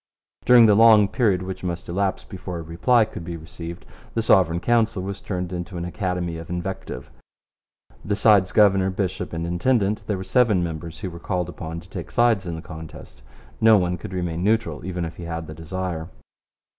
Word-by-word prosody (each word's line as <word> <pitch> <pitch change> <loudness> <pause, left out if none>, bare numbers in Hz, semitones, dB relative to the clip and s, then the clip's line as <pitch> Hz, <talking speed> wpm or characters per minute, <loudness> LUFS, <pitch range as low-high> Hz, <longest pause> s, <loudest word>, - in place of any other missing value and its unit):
During 120 -1 +8
the 105 - +6
long 110 -1 +7
period 100 -5 +1
which 95 0 -6
must 85 -1 -4
elapse 95 +2 -1
before 90 -3 -7
a 85 - -6
reply 110 +9 +3
could 90 - -9
be 85 0 -5
received, 85 +1 -9 0.3
the 115 - +1
Sovereign 90 -6 +4
Council 115 0 +1
was 100 +1 -5
turned 90 -2 -4
into 90 +1 -5
an 85 - -3
academy 90 -1 -3
of 80 +1 -9
invective. 90 +2 -5 0.9
Besides 100 -2 +3
governor, 95 -2 +4
bishop, 95 -1 -3
and 85 0 -3
intendant, 105 +4 +1
there 105 - -1
were 95 - -5
seven 105 -2 +3
members 80 0 -6
who 95 -3 -4
were 85 - -9
called 90 0 -2
upon 80 0 -6
to 90 - -17
take - - -7
sides 115 -6 +2
in 85 - -3
the 80 - -8
contest. 80 -6 -11 0.4
No 110 -1 +7
one 90 -2 0
could 90 +1 -8
remain 90 -2 -3
neutral 105 -8 0
even 90 -1 -3
if 80 0 -8
he 85 - -7
had 80 -1 -4
the 80 - -8
desire. 85 0 -5
90 Hz, 190 wpm, -23 LUFS, 85-100 Hz, 0.9 s, During